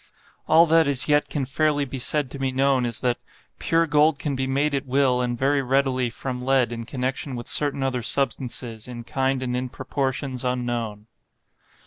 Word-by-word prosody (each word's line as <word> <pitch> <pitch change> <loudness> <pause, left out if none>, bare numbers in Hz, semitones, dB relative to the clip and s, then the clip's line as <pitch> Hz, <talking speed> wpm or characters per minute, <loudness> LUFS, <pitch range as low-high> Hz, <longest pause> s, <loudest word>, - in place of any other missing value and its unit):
All 160 +2 +7
that 165 -1 +4
as 140 -3 +1
yet 150 0 +3
can 140 -3 -1
fairly 145 +1 +1
be 135 0 -6
said 140 +1 0
to 140 - -7
be 135 -1 0
known 130 -1 +2
is, 115 - -4
that 125 -1 0 0.4
'Pure 165 0 +2
gold 150 0 +3
can 145 -2 -2
be 130 0 -1
made 140 +3 +1
at 140 0 -2
will, 130 -1 +2
and 120 -1 -1
very 140 +3 +2
readily 130 -1 +1
from 125 +1 -5
lead 130 -2 +2
in 115 -1 -5
connection 130 +2 -3
with 120 -1 -6
certain 140 -2 -1
other 130 -2 -1
substances, 120 -3 -2
in 120 -1 -7
kind 130 +1 -1
and 125 -1 -2
in 125 0 -2
proportions, 130 0 -3
unknown. 120 -4 -2
130 Hz, 185 wpm, -24 LUFS, 125-140 Hz, 0.4 s, All